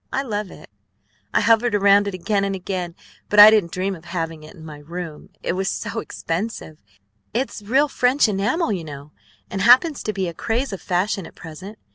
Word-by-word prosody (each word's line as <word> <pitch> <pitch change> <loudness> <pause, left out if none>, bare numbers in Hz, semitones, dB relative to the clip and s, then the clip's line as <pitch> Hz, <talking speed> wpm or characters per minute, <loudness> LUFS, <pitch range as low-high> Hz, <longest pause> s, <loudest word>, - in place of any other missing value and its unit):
I 270 - -1
love 210 -5 -3
it. - - -14 0.6
I - - +2
hovered 225 +1 +3
around 200 0 +4
it 200 - -3
again 200 +2 0
and 195 0 -1
again; 180 -2 -4 0.3
but 210 - +3
I 210 +1 +12
didn't 205 -6 +2
dream 190 +2 -2
of 165 -1 -15
having 165 -3 -4
it 155 +5 -13
in 160 -3 -12
my 150 -2 -9
room, 165 0 -8
it - - -1
was 190 +1 -1
so - - -4
expensive. 165 -3 -5 0.6
It's 255 -2 -2
real 265 +8 +2
French 255 -1 +2
enamel, 215 - 0
you 180 -4 -4
know, 145 -1 -10 0.4
and 195 - -3
happens 255 - +5
to 215 - -2
be 190 -3 -2
a 170 - -5
craze 230 - -2
of 195 - -6
fashion 185 0 -1
at - - -16
present. 185 +6 -10
195 Hz, 200 wpm, -22 LUFS, 170-220 Hz, 0.6 s, I